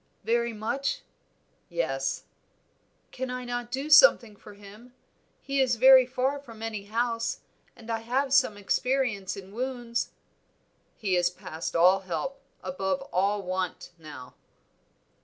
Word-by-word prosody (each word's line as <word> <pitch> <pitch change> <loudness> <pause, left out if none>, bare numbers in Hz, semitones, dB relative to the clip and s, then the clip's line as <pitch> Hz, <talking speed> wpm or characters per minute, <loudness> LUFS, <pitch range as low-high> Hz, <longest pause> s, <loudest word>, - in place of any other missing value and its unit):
"Very 235 +2 +1
much?" 235 +6 -2 0.7
"Yes." 135 -6 -2 0.9
"Can 260 0 -4
I 250 0 -4
not 245 0 -4
do 270 +3 -3
something 260 - +7
for 205 0 -14
him? 210 +5 -15 0.5
He 275 0 0
is 250 -2 +2
very 260 +1 +7
far 265 +3 -1
from 230 -5 -12
any 215 -3 -4
house, 230 +2 -1 0.3
and 230 - -14
I 225 - -1
have 260 +4 -1
some 215 -6 +4
experience 225 -2 -1
in 195 0 -10
wounds." 245 0 -3 0.9
"He 195 -4 0
is 175 0 +3
past 165 -2 -7
all 180 +3 +6
help, 190 - -4 0.2
above 190 +8 -2
all 200 +2 +1
want 185 -1 -3
now." 145 -5 -11
225 Hz, 130 wpm, -27 LUFS, 190-255 Hz, 0.9 s, something